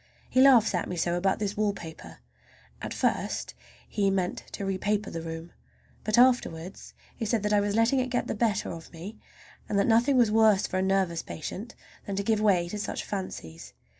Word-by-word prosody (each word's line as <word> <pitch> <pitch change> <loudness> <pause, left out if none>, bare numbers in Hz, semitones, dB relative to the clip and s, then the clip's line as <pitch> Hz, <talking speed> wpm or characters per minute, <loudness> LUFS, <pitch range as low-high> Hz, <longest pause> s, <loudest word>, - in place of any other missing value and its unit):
He 255 - +3
laughs 250 -6 +6
at 180 - -1
me 180 - -3
so 170 0 0
about 190 +2 +1
this 205 -1 -2
wallpaper! 200 -6 -4 0.6
At - - -5
first - - -1 0.3
he 200 -2 +1
meant 185 -2 -1
to 200 - -4
repaper 200 +2 -1
the 165 - -4
room, 165 +1 -7 0.5
but 215 +1 +1
afterwards 205 -8 +1 0.2
he - - -5
said 220 -1 0
that 210 0 +1
I 205 - +5
was 205 0 0
letting 230 +4 +3
it 255 0 -1
get 245 0 0
the - - -2
better 215 -2 0
of 165 -1 -9
me, 180 +6 -9 0.5
and 205 - 0
that 200 - +3
nothing 240 +4 +4
was 235 -4 +4
worse 215 -2 +4
for 185 - -2
a - - +1
nervous 190 -3 +1
patient 205 +8 -7 0.3
than 200 - -3
to 200 - -1
give 215 0 +1
way 185 -5 +3
to 210 - -5
such - - -3
fancies. 135 - -6
200 Hz, 195 wpm, -28 LUFS, 180-220 Hz, 0.6 s, laughs